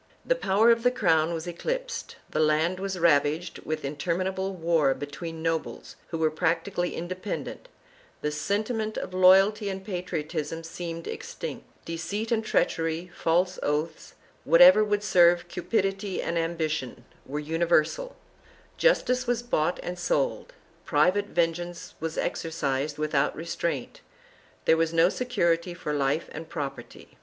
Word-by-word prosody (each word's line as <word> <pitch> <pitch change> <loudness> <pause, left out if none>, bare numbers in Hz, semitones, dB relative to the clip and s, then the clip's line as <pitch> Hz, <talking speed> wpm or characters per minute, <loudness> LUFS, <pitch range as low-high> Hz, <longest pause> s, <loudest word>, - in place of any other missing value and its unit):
The - - +3
power 225 - +3
of 230 0 +3
the 245 - +4
crown 170 -10 +2
was 165 -1 -4
eclipsed; - - -4
the - - -3
land 155 +4 +2
was 195 -1 -3
ravaged 160 0 +2
with 155 -2 -4
interminable 185 +6 -2
war 165 -6 +2
between 160 +3 -7
nobles 165 -1 -3
who 165 - -4
were 160 -1 +2
prac 165 +1 0
tically 180 -3 -2
independent; 185 - -5 0.6
the 150 - 0
sentiment 215 +7 -2
of 185 - -5
loyalty 195 +3 +5
and 190 0 -5
patriotism 165 -4 -4
seemed 165 0 -6
extinct; - - -6 0.2
deceit 175 +7 -4
and 225 -1 +1
treachery, 165 -3 0
false 180 +3 +1
oaths 150 +3 -2
— - - -32
whatever 180 +6 +8
would 205 -1 0
serve 175 -3 +4
cupidity 195 0 -1
and 170 - -2
ambition 160 -7 -2
— - - -31
were 145 - -4
universal; 165 - +1 0.6
justice 255 - +2
was 240 -1 0
bought 175 -8 0
and 180 0 -5
sold; - - -1 0.3
private 185 +5 +2
vengeance 175 0 -2
was 160 0 -4
exercised 150 -4 -2
without 150 -2 +1
restraint; 170 - -3 0.6
there 160 - +5
was 165 0 0
no 165 +2 +5
security 175 -8 0
for 150 -3 -4
life 145 +2 0
and 160 +1 -8
property. 140 - -7
170 Hz, 140 wpm, -27 LUFS, 160-195 Hz, 0.6 s, whatever